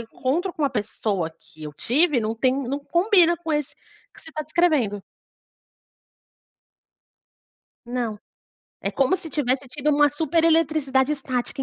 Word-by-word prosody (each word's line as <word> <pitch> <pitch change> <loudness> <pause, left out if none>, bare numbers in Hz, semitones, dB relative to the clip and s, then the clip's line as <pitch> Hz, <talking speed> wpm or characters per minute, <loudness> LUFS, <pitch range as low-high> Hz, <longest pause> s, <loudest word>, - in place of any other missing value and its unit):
encontro 275 +10 -2
com 310 - -5
uma 280 - +2
pessoa 205 -6 -2
que 160 0 -18
eu 150 - -7
tive 265 - +2
não 220 +1 -2
tem 255 +3 +2 0.2
não 280 +2 -2
combina 345 -1 +4
com 330 -1 -6
esse 295 -2 -2 0.4
que - - -15
você 320 - -13
está 310 0 -4
descrevendo." 290 - +1 2.8
Não. 240 -3 -3 0.6
É - - -1
como 275 +7 +2
se 330 -5 -9
tivesse 270 -1 -1
tido 295 +3 -3
uma 295 0 +5
super 320 +2 0
eletricidade 300 -4 +2
estática 265 -2 -3
280 Hz, 140 wpm, -23 LUFS, 240-320 Hz, 2.8 s, uma